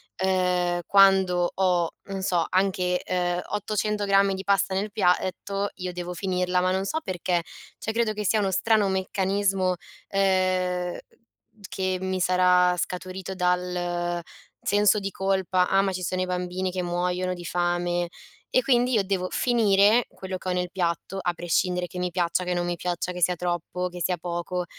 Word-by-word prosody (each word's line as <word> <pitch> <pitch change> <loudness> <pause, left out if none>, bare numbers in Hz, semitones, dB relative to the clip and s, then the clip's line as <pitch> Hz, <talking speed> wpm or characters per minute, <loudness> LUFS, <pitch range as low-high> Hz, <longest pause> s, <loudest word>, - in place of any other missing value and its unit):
ehm, 180 -2 +1
quando 190 -3 +5
ho, 180 -3 +2
non 195 -1 -5
so, 180 -3 +1
anche, 185 -1 +1
uhm, 175 -1 0
800 210 0 -1
grammi 195 0 +3
di 190 - -6
pasta 195 -1 +2
nel 200 +2 -2
piatto 195 +1 0
io 180 -1 -4
devo 180 0 -5
finirla, 180 0 0
ma 185 - +1
non 190 +1 0
so 315 - -1
perché; 180 -2 -1 0.4
cioè, 220 - -3
credo 225 -1 0
che 210 0 -4
sia 215 - +3
uno 195 -2 0
strano 215 +2 +2
meccanismo, 190 0 0 0.3
ehm, 185 -2 +1 0.7
che 185 -1 -2
mi 185 0 -2
sarà 180 0 +4
scaturito 185 +2 -4
dal 180 -1 -1 0.4
senso 205 +1 +3
di 195 -1 -3
colpa: 190 -1 +1
"Ah, 195 - +3
ma 195 -1 0
ci 185 0 -4
sono 185 +1 -1
i - - +1
bambini 180 +1 -2
che 180 0 -3
muoiono 180 +1 -1
di 175 -1 -8
fame," 175 0 0 0.4
e 255 - +4
quindi 250 0 +2
io 215 -4 +3
devo 190 -1 -1
finire 220 -1 +4
quello 190 0 -6
che 185 - -5
ho - - +1
nel 180 0 -1
piatto, 175 +1 -2
a 175 -2 -1
prescindere 180 +1 0
che 180 - -10
mi 180 0 -1
piaccia, 175 0 0
che 180 0 -1
non 175 0 -1
mi 175 - -1
piaccia, 175 +1 -3
che 180 0 -6
sia 180 +2 +3
troppo, 175 +1 -2
che 175 0 -8
sia 180 +1 0
poco. 175 +1 -3
185 Hz, 170 wpm, -25 LUFS, 180-195 Hz, 0.7 s, quando